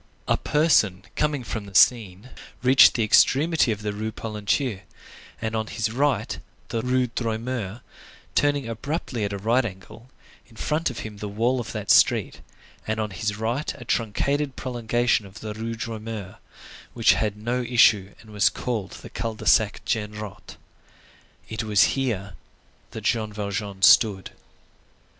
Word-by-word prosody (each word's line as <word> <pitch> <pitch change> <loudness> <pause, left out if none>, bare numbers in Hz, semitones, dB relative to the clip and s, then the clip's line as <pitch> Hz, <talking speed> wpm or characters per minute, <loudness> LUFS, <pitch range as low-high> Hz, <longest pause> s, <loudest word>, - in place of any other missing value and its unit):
A - - +3
person 110 - +2
coming 150 -3 0
from 110 -3 -5
the 100 - -13
Seine 105 0 +3 0.3
reached 130 0 +7
the 115 - +1
extremity 140 +5 +4
of 105 -1 -4
the 105 -1 -2
Rue 110 +2 -4
Polonceau, 105 +1 -2 0.6
and 110 0 -3
had - - -1
on 110 -1 -2
his 110 -1 -2
right 140 +4 0 0.3
the 115 -1 -2
Rue 125 +1 +1
Droit 115 -2 -3
Mur, 120 -3 -4 0.5
turning 145 -3 +1
abruptly 120 0 -3
at 100 - -3
a 100 - -3
right 115 +6 +2
angle, 110 +4 -9 0.4
in 115 - -20
front 150 +8 -1
of 125 - -6
him 105 -1 -8
the 105 - -5
wall 115 +5 0
of 115 - -5
that - - -1
street, - - +3 0.5
and 110 0 -1
on 105 -1 -2
his 100 +2 -3
right 115 +7 -2
a 120 - -10
truncated 135 +6 -1
prolongation 120 -3 0
of 95 - -13
the 110 -1 -5
Rue 115 +1 -4
Droit 115 -1 -5
Mur, 110 -4 -7 0.6
which 115 -2 +5
had 105 -1 -1
no 120 +4 -2
issue 115 -5 +3
and 110 - -16
was 105 -1 +3
called 110 -6 -4
the - - -9
Cul 115 -1 -4
de - - -10
Sac 110 -1 +3
Genrot. 105 -2 -5 0.9
It 110 +1 -4
was 105 -1 +4
here 110 -8 -2 0.6
that - - -8
Jean 110 -3 0
Valjean 100 -1 -4
stood. 95 -2 +5
110 Hz, 160 wpm, -24 LUFS, 105-125 Hz, 0.9 s, reached